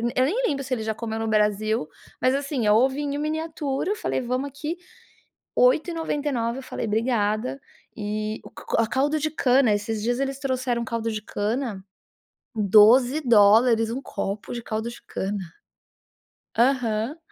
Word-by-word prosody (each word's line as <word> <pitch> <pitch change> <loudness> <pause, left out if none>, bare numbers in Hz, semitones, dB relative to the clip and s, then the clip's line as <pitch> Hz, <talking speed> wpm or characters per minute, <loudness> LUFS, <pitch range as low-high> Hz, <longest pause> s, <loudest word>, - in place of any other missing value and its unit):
eu 255 - +4
nem 430 - 0
lembro 275 -2 -2
se 265 -1 -3
ele 220 - -4
já 220 0 -1
comeu 220 0 -4
no 225 0 -2
Brasil, 215 -3 +1 0.3
mas, 255 +1 +3
assim, 275 -5 -1
é 210 - +5
ovinho 270 +5 +2
em - - -2
miniatura, 310 0 -2
eu - - 0
falei 340 - -2
vamos 255 +3 -2
aqui 300 +5 -5 0.8
8,99 295 - +1
eu - - -9
falei: 245 - -4
"Obrigada", 220 +3 0 0.3
e 215 -1 -3
o - - -11
co - - -2
o 225 - -1
caldo 290 +5 +1
de 310 +1 0
cana, 260 -6 +3
esses 210 +1 -3
dias 240 +3 0
eles 275 0 -2
trouxeram 255 -3 -1
caldo 230 0 -2
de 215 -1 -4
cana, 210 -1 -3 0.7
12 225 +7 +5
dólares 225 0 +5
um 255 +4 -4
copo 200 -4 -4
de 240 -1 -5
caldo 220 +1 -3
de 235 - -11
cana. 200 +2 -3 1.2
Aham. 240 +1 +1
240 Hz, 160 wpm, -24 LUFS, 220-275 Hz, 1.2 s, é